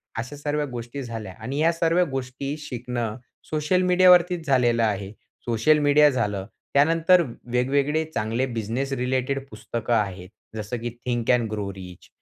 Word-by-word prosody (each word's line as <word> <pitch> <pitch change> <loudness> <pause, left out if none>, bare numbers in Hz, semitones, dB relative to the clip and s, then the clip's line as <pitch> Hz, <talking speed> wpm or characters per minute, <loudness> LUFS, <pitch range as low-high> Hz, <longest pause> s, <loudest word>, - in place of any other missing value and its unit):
अशा 125 +5 -5
सर्व 145 +1 -2
गोष्टी 120 +3 -6
झाल्या. 115 -5 -6
आणि 125 +5 -4
या 165 +2 +4
सर्व 165 +1 +2
गोष्टी 135 +2 -4
शिकणं 120 -5 -4 0.3
सोशल 155 +4 +1
मीडियावरतीच 180 -2 +5
झालेलं 120 -4 +3
आहे. 100 -3 -1 0.3
सोशल 120 +6 +3
मीडिया 150 0 +5
झालं. 105 -7 -1 0.3
त्यानंतर 165 +5 +5 0.3
वेगवेगळे 140 +5 +1
चांगले 115 +4 0
बिझनेस 120 +3 -3
रिलेटेड 130 +1 -1
पुस्तकं 120 -2 -4
आहेत. 95 -5 -1 0.3
जसं 110 +3 -4
की 120 +1 -3 0.2
Think 120 -2 -1
and 120 -2 -1
Grow 105 -2 -3
Rich, 90 -2 -11
125 Hz, 140 wpm, -24 LUFS, 115-150 Hz, 0.3 s, मीडियावरतीच